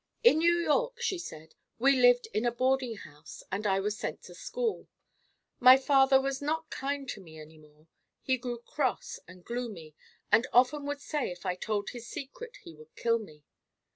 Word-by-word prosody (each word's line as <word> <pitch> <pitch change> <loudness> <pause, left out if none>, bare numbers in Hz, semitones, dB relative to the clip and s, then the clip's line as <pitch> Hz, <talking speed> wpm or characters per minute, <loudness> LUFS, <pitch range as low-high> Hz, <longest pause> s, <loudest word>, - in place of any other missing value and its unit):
"In 470 -9 +6
New 340 +1 +4
York," 470 +9 0
she 390 -6 -1
said, 160 - -9 0.2
"we 275 +3 +4
lived 245 -1 +5
in 215 - 0
a 240 - +2
boarding 255 0 0
house 150 -6 -12
and 205 +2 -1
I 195 -1 +2
was 210 +2 -1
sent - - -5
to - - -12
school. - - -3 0.7
My 255 +1 +9
father 270 0 +4
was 270 0 -2
not 320 +2 -2
kind 275 0 -3
to 210 - -5
me 160 -3 -13
any 155 +1 -13
more. 150 0 -21 0.4
He 260 -1 +1
grew 245 -1 -4
cross 255 +2 -3
and 180 0 -15
gloomy 220 -11 -5 0.4
and 240 +3 +4
often 270 +4 +3
would 285 0 -4
say 295 -1 -2
if 175 +2 -10
I 180 - +1
told 205 +2 -3
his 240 -1 -9
secret 460 - -8
he 165 - -11
would 155 0 -17
kill 230 0 +1
me. 155 -9 -13
245 Hz, 190 wpm, -30 LUFS, 195-285 Hz, 0.7 s, My